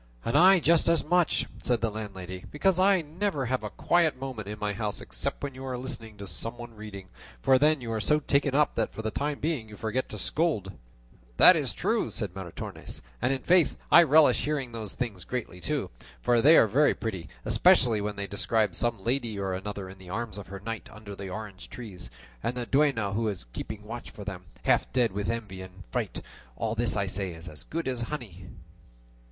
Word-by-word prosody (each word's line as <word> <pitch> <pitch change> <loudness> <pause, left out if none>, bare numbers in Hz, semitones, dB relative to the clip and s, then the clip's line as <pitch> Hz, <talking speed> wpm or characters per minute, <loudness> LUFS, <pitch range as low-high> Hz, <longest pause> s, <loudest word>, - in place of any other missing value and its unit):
"And 115 - -1
I 185 +4 +7
just 165 +1 +4
as 170 -1 +3
much," 175 +1 +2 0.2
said 120 -2 +1
the 115 -1 0
landlady, 95 -4 -7
"because 185 +4 +2
I 190 -2 +4
never 155 -2 -2
have 130 -1 -1
a 105 - -3
quiet 165 -1 +2
moment 130 -6 -5
in 105 +1 -5
my 105 -1 -2
house 105 0 -2
except - - -4
when 140 -1 -3
you 130 +1 -9
are 130 -1 -3
listening 115 -4 -7
to 100 - -7
some 115 +6 -4
one 120 -1 -9
reading; 105 -3 -9 0.3
for 130 - +4
then 150 0 +3
you 115 -2 -4
are 110 - -1
so 150 +9 +3
taken 140 -2 +1
up 150 0 +3
that 115 - -1
for 110 - -7
the 110 - -1
time 145 +3 -2
being 145 -8 -2
you 105 - -11
forget 120 +4 -2
to 105 - -6
scold." 105 - 0 0.7
"That - - +10
is - - +1
true," - - 0
said 95 -4 -2
Maritornes; 95 -3 -7 0.2
"and, 135 0 0
faith, 175 -2 +4
I 170 - +10
relish 155 -1 +5
hearing 140 -4 -2
these 110 -4 -5
things 105 -8 -4
greatly 115 -5 -5
too, 85 - -2 0.3
for 120 - +3
they 155 +5 +8
are - - +7
very 140 +8 +3
pretty; 95 -8 -4 0.2
especially 115 -5 +4
when 105 0 -3
they 100 0 -3
describe 105 0 +1
some 115 +2 -1
lady 120 -3 -1
or 95 -1 -2
another 95 +1 -5
in 95 +1 -11
the 90 -1 -12
arms 110 0 -4
of 100 - -9
her 95 0 -7
knight 115 +2 -5
under 105 -1 -9
the 100 -1 -7
orange 100 -1 -7
trees, 95 - -9 0.3
and 125 - -2
the 120 - -2
duenna 135 -8 +2
who 110 +2 0
is 100 - -2
keeping 105 -1 -6
watch 115 +3 -7
for 105 - -10
them 95 -2 -6 0.2
half - - +2
dead 120 -3 +2
with 100 +1 -2
envy 105 -5 -4
and 95 0 -11
fright; - - -2 0.3
all 110 - -1
this 115 -1 0
I 100 - +1
say 95 -1 -1
is 80 +1 -11
as 75 -2 -5
good 165 -1 -4
as 125 -2 -2
honey." 100 - -7
115 Hz, 215 wpm, -28 LUFS, 100-135 Hz, 0.7 s, That